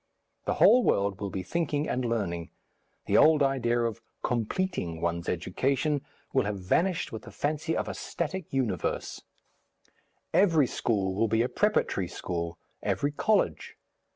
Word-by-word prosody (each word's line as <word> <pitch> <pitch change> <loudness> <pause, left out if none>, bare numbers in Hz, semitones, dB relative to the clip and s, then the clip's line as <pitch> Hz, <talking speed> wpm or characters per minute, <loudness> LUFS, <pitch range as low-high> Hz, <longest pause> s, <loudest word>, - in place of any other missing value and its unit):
The - - 0
whole 250 - +7
world 100 - +1
will 100 - -2
be 95 -1 -4
thinking 150 - -1
and 130 - -1
learning; 95 -8 -2 0.6
the - - +3
old 155 -2 +6
idea 120 -3 +1
of 115 -1 -2 0.2
"completing" 120 - -1
one's 85 +1 -1
education 135 - 0 0.3
will 130 - +3
have 105 -1 -2
vanished 170 - 0
with 110 - -6
the - - -11
fancy 155 +2 -1
of - - -2
a - - -3
static 170 +1 -4
universe; 130 -5 -1 1.1
every 165 -7 +5
school 100 -6 0
will 115 +4 +1
be 110 +2 +2
a - - +1
preparatory 205 - +1
school, 85 -1 -4 0.2
every 145 - 0
college. 210 +8 0
120 Hz, 145 wpm, -28 LUFS, 95-155 Hz, 1.1 s, whole